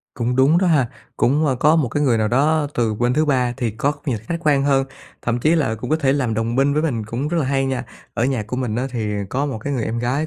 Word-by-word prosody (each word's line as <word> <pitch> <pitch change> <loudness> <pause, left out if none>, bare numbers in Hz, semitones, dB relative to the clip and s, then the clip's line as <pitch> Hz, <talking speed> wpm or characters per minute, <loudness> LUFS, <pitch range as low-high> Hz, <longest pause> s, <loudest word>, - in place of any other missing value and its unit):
Cũng 125 +1 -1
đúng 145 +6 +5
đó 190 - +1
ha. 145 -8 +3 0.3
Cũng, 150 +5 +2
ơ, 135 - +2
có 150 +5 +4
một 150 -6 +1
cái 145 +5 -1
người 125 -6 +3
nào 110 0 +1
đó 150 +5 +2
từ 115 -3 0
bên 120 +3 0
thứ 155 +1 +2
ba 125 -4 +1
thì 115 -5 -2
góc 145 +1 -1
nhìn 115 - 0
khách 115 +11 -4
quan 145 -4 +2
hơn, 135 -1 +2 0.4
thậm 120 +1 -1
chí 155 +6 +3
là 140 -9 +1
cũng 120 +3 -7
có 155 - +3
thể 135 -4 +1
làm 130 -6 0
đồng 115 +1 -1
minh 140 +2 +2
với 150 +2 +1
mình 120 -9 -1
cũng 125 +6 -3
rất 170 +1 0
là 155 - +1
hay 135 0 0
nha. 130 -1 -2 0.3
Ở 120 - 0
nhà 130 -4 0
của 115 +4 -5
mình 120 -4 -2
á 125 +2 -1
thì 110 -4 -3 0.2
có 140 +6 -1
một 130 -6 -4
cái 140 +6 -4
người 120 -5 -1
em 115 +1 -3
gái 130 +6 -1
130 Hz, 290 wpm, -20 LUFS, 120-145 Hz, 0.4 s, đúng